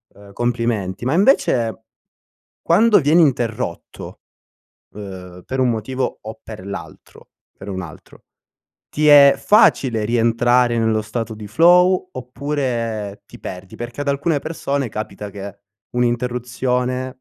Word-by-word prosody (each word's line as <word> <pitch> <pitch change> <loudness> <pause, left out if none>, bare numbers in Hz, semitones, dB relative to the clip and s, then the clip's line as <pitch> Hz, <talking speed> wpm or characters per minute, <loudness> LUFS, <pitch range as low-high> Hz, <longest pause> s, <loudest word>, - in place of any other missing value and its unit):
ehm, 100 0 -16
complimenti. 115 -4 -2
Ma 130 - +1
invece, 130 - +2 0.8
quando 210 +6 +4
vieni 155 +3 +4
interrotto, 120 -6 -3 0.7
ehm, 90 -3 -9
per 130 - -4
un 130 -1 +3
motivo 120 +3 -3
o 110 0 -9
per 105 -4 -10
l'altro 100 0 -10 0.3
per 95 - -10
un 95 -2 -4
altro, 80 -4 -13 0.7
ti 150 +1 0
è 140 -1 +8
facile 130 - +3
rientrare 120 +1 +2
nello 110 -1 +1
stato 110 +1 -5
di 105 -1 -9
flow, 180 - +4
oppure 120 -5 -4
ti - - -15
perdi? 90 0 -9
Perché 120 +4 -6
ad 145 - -4
alcune 140 +2 0
persone 140 -5 -3
capita 105 -1 -6
che 100 0 -9 0.4
un'interruzione 125 +1 -1
120 Hz, 120 wpm, -19 LUFS, 105-140 Hz, 0.8 s, è